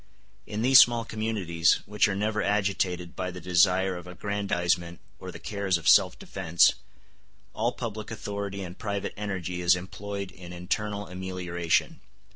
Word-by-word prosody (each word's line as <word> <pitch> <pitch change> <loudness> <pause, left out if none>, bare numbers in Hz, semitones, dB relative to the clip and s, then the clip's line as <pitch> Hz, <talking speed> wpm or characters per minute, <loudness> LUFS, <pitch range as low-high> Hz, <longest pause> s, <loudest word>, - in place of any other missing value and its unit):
In 105 +1 -3
these 130 +1 +8
small 120 -1 +5
communities, 105 -7 +1
which 105 +1 +2
are 95 - -2
never 105 +1 -1
agitated 95 -4 -1
by 90 0 -3
the 90 0 -8
desire 90 +2 +3
of 90 0 -9
aggrandizement 90 -2 -1 0.2
or - - -7
the - - -9
cares 100 -3 -1
of 85 0 -7
self 90 0 +6
defence, 80 +1 +2 0.8
all 115 +3 0
public 110 -3 -6
authority 100 -3 -5
and 90 0 -9
private 100 -2 -3
energy 95 -4 -4
is 90 0 +5
employed 100 +2 -6
in 90 -1 -11
internal 100 +3 -3
amelioration. 90 -2 -2
95 Hz, 145 wpm, -27 LUFS, 90-105 Hz, 0.8 s, these